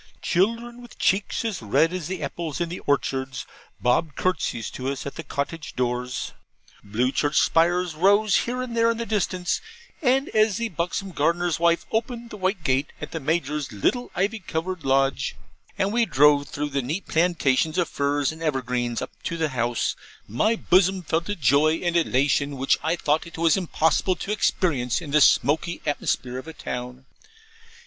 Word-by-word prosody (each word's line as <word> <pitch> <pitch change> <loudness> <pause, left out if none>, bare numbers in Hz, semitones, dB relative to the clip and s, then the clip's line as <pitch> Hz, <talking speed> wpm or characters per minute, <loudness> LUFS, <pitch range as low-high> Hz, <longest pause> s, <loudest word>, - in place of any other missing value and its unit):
Children, 230 +6 0
with 240 - -14
cheeks 195 +4 +1
as 215 - -2
red 155 - +2
as 180 -4 -4
the 185 0 -4
apples 165 -3 -4
in 170 -1 -1
the 175 - -5
orchards, 130 -2 -1 0.3
bobbed 130 +5 +1
curtsies 160 -11 -1
to 130 +1 -4
us 140 - -4
at 140 - -5
the - - -6
cottage 155 +2 -5
doors. 125 0 -2 0.5
Blue 115 +6 0
church 145 +2 0
spires 175 +1 +3
rose 200 +5 +4
here 250 +1 -1
and 240 -2 -6
there 230 0 +4
in 230 - 0
the 235 - -3
distance: 185 -4 -1 0.4
and 270 0 +2
as 215 -2 +2
the 230 -1 -2
buxom 180 +3 -3
gardener's 175 -1 +1
wife 170 0 +2
opened 235 +1 -2
the 210 - -7
white 185 -2 -1
gate 135 +1 +1
at - - -7
the 165 - -3
Major's 150 -2 -1
little 245 - 0
ivy 205 +4 0
covered 175 -1 -4
lodge, 135 0 +1 0.4
and 195 +2 0
we 235 -1 +2
drove 145 0 +4
through 145 +1 -3
the 140 0 0
neat 155 +10 -3
plantations 160 -2 +1
of 175 -3 +2
firs 145 0 0
and 160 +1 -11
evergreens, 125 -5 -1
up - - -7
to 170 - -3
the 160 -2 0
house, 120 -2 -1 0.3
my 215 - +1
bosom 190 -2 +3
felt 165 +3 -1
a 205 - -1
joy 150 - +3
and 175 +1 -2
elation 140 -2 +2
which 135 +1 +3
I 160 +2 +1
thought 155 0 0
it 170 - -11
was 165 -1 +4
impossible 180 0 +1
to 200 - -5
experience 145 - +1
in 155 -5 -8
the 150 +1 +4
smoky 155 +6 +3
atmosphere 130 -3 -1
of 130 - -11
a 160 - -7
town. 125 0 -6
165 Hz, 180 wpm, -24 LUFS, 140-185 Hz, 0.5 s, rose